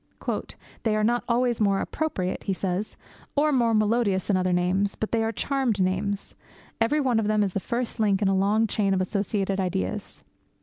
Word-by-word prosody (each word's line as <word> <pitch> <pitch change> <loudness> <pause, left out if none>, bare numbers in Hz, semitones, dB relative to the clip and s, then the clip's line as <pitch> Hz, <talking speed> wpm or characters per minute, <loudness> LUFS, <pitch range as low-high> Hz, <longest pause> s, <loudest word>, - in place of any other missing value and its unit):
'They 220 -2 +1
are 215 - +1
not 240 +2 +2
always 240 -1 +1
more 200 -2 +3
appropriate,' 190 -13 -2
he 195 - 0
says, 190 +2 -3 0.4
'or 300 +1 +3
more 240 -4 +3
melodious 215 -3 +2
than 205 - +1
other 185 0 +1
names. 185 +3 +1
But 220 - -4
they 225 -1 +1
are 225 - 0
charmed 260 -4 0
names. 195 +2 -1 0.5
Every 245 +7 +3
one 255 -5 +2
of 215 - 0
them 215 -1 +2
is 195 -3 -2
the - - 0
first 235 +3 -3
link 205 -3 +3
in 200 - +1
a 195 - +2
long 205 +4 +3
chain 200 -2 +1
of 185 - +1
associated 195 0 -1
ideas. 130 - -3
210 Hz, 190 wpm, -26 LUFS, 190-230 Hz, 0.5 s, more